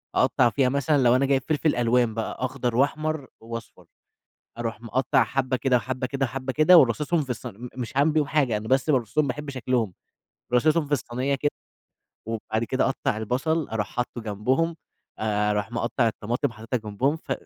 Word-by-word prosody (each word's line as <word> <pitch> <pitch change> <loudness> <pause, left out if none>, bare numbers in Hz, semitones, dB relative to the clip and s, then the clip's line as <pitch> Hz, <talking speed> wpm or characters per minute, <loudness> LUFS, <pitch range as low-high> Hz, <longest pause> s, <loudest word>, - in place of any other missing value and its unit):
أقطّع 125 -2 +4
فيها 130 +2 +2
مثلًا 140 0 +2
لو 120 +1 +5
أنا 135 - +3
جايب 135 -1 +2
فلفل 155 0 +1
ألوان 120 -1 +2
بقى 110 0 -3
أخضر 125 -2 -2
وأحمر 145 +2 0
وأصفر، 115 0 -9 0.7
أروح 115 -2 -3
مقطع 120 +2 +2
حبة 130 +3 -1
كده، 130 -1 +2
وحبة 130 +2 -2
كده، 135 +1 -1
وحبة 130 +2 -4
كده 155 +5 +7
وراصصهم 150 +6 +2
في 135 - -8
الص 125 +1 -4
م 120 +2 -7
مش 125 0 -5
هاعمل 145 +3 +4
بيهم 150 -2 +2
حاجة 140 -7 +1
أنا 110 +1 -5
بس 135 +3 +2
بارصُهم 135 +3 +1
باحب 145 +3 -4
شكلهم، 125 -6 -1 0.6
راصصهم 150 +5 +3
في 145 - -7
الصينية 135 0 0
كده، 145 +2 0 0.8
وبعد 110 0 -2
كده 130 +3 0
أقطّع 130 -4 -1
البصل 135 +8 -1
أروح 110 -2 -2
حاطّه 125 0 -4
جنبهم 125 +10 0 0.4
آآ، 105 -1 +1
أروح 105 +1 -2
مقطع 120 0 0
الطماطم 115 +2 -2
حاططها 115 +3 -3
جنبهم 135 +9 +1
ف 160 - -10
130 Hz, 175 wpm, -25 LUFS, 115-140 Hz, 0.8 s, كده